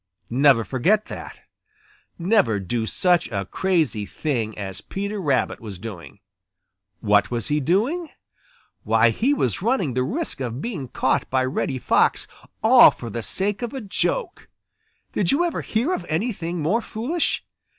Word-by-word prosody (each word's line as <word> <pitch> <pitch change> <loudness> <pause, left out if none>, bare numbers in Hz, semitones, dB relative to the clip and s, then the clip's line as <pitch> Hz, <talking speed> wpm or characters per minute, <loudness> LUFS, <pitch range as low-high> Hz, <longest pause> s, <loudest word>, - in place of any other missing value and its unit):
Never 130 -2 +5
forget 180 - +1
that. - - -9 0.8
Never 170 - +2
do 110 +4 -2
such 180 - +2
a 100 -3 -3
crazy 155 - 0
thing 115 -8 -2
as 95 -2 -6
Peter 200 +1 -4
Rabbit 140 -6 0
was 105 -5 -8
doing. 100 -2 -9 0.8
What 105 -1 +3
was 120 -2 -3
he 150 +1 +2
doing? 235 - 0 0.7
Why, 115 +2 +4
he 245 - +1
was 130 - 0
running 205 - +1
the 130 - 0
risk 270 - -2
of 125 -2 -4
being 160 - -4
caught - - 0
by 130 0 +1
Reddy 130 0 -2
Fox - - +2 0.4
all - - +9
for 115 - -8
the 115 - -3
sake 195 - -2
of 240 +2 -4
a 265 - -4
joke. 360 - -2 0.6
Did 185 -4 +1
you 300 - +3
ever 345 - -2
hear 245 +11 0
of - - -3
anything 175 -2 -2
more 210 +10 +2
foolish? 260 +11 -2
155 Hz, 150 wpm, -23 LUFS, -, 0.8 s, all